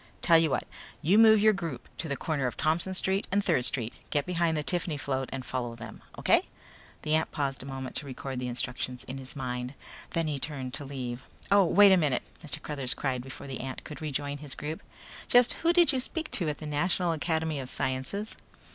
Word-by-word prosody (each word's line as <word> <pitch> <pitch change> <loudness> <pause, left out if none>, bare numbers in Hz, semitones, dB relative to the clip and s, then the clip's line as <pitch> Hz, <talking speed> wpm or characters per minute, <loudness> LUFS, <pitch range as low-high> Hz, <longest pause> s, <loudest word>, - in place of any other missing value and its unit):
"Tell 165 -1 +6
you 165 -1 +2
what. - - -1 0.4
You 190 +8 +4
move 220 -2 +7
your 215 0 +5
group 165 -10 -5
to 165 - -3
the 140 - -2
corner 145 -5 -1
of 125 - -5
Thompson 165 +4 +1
Street 190 +2 +5
and 200 +1 +1
Third 125 - +2
Street. 120 -4 +6 0.2
Get 145 -2 0
behind 170 -3 0
the 150 - -2
Tiffany 170 -2 0
float 135 -2 -3
and 130 -1 -5
follow 120 -2 -3
them, 115 -2 -10 0.2
okay?" - - +4 0.6
The 155 - -1
ant 160 0 +1
paused 140 -3 +2
a 135 - -4
moment 135 -1 -6
to 145 - -5
record 130 -1 -5
the 125 - -3
instructions 125 +1 -2
in 135 +1 -7
his 130 0 -6
mind. 125 -1 -4 0.3
Then 165 -1 -1
he 150 -3 -2
turned 130 -3 -5
to 145 - -3
leave. 130 -2 -5 0.3
"Oh, 200 -1 +6
wait 200 +3 +6
a 190 - +6
minute," 145 -7 +1 0.2
Mr. 145 -5 -5
Cruthers 135 -5 -3
cried 130 -3 -2
before 135 +2 -10
the 135 -2 -6
ant 130 0 -6
could 150 -2 -9
rejoin 145 -1 -3
his 145 -2 -6
group. 155 +2 -5 0.5
"Just 245 0 +5
who 335 - +4
did 345 -3 +4
you 260 - +1
speak 320 +5 -1
to 170 -6 0
at 150 - -3
the 155 - -8
National 170 +4 0
Academy 160 -1 -1
of 130 -1 -6
Sciences?" 130 +14 -2
145 Hz, 220 wpm, -28 LUFS, 130-170 Hz, 0.6 s, move